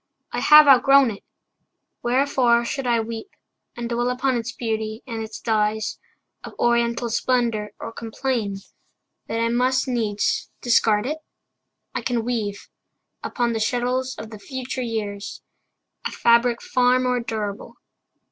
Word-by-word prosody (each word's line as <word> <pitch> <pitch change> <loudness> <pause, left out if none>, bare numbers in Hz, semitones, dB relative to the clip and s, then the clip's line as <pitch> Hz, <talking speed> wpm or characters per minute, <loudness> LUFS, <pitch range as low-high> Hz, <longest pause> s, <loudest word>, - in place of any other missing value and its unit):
I - - -2
have 300 0 +8
outgrown 275 -1 +6
it. 200 - -10 0.8
Wherefore 245 -2 +2
should 270 +1 -3
I 235 -1 +3
weep 225 - -6 0.5
And 240 -1 -3
dwell 240 +1 0
upon 250 +1 0
its 235 0 -3
beauty, 220 -2 -3
and 230 -3 -5
its 220 0 -7
dyes 215 -1 0 0.4
Of - - -10
oriental 235 0 +1
splendor, 230 -3 0
or 225 - -6
complain 230 -2 -2 0.7
That 225 - -2
I 230 0 +1
must 255 +3 +1
needs 220 -5 -1
discard 220 -3 +3
it? 305 +4 -3 0.7
I - - -2
can 240 -3 -1
weave 215 -5 -3 0.5
Upon 240 -2 -1
the 225 - -1
shuttles 250 +3 -1
of 220 - -8
the 215 - -9
future 260 +3 -5
years 210 -4 -4 0.6
A - - -9
fabric 235 0 +3
far 250 0 +3
more 250 -1 +1
durable. 215 -3 -5
235 Hz, 140 wpm, -23 LUFS, 220-250 Hz, 0.8 s, have